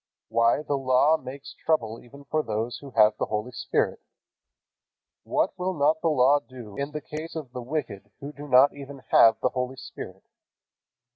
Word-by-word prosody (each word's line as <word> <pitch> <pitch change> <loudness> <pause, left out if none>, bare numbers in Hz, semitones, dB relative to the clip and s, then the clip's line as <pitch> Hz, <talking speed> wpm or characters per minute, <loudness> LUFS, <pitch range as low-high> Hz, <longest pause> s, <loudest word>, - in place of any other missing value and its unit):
Why, 115 +5 +2
the 145 -2 -1
Law 135 +4 +4
makes 140 +1 -9
trouble 115 -8 -1
even 140 +4 -14
for 155 +2 0
those 115 -1 -3
who 140 - -10
have 105 0 +6
the - - 0
Holy 105 +3 -3
Spirit. 130 - -1 1.2
What - - 0
will 185 +1 -1
not 155 +2 +2
the - - +1
Law 140 0 +4
do 120 -7 -12
in 140 +1 -3
the 150 0 -6
case 155 +3 -7
of 150 -6 -6
the 125 0 -6
wicked 120 -7 -4
who 145 +1 -7
do 145 0 -9
not 130 +1 +6
even 140 -1 -10
have 110 -1 +6
the 130 - +2
Holy 125 +1 -3
Spirit? 95 -7 -9
135 Hz, 175 wpm, -26 LUFS, 120-145 Hz, 1.2 s, have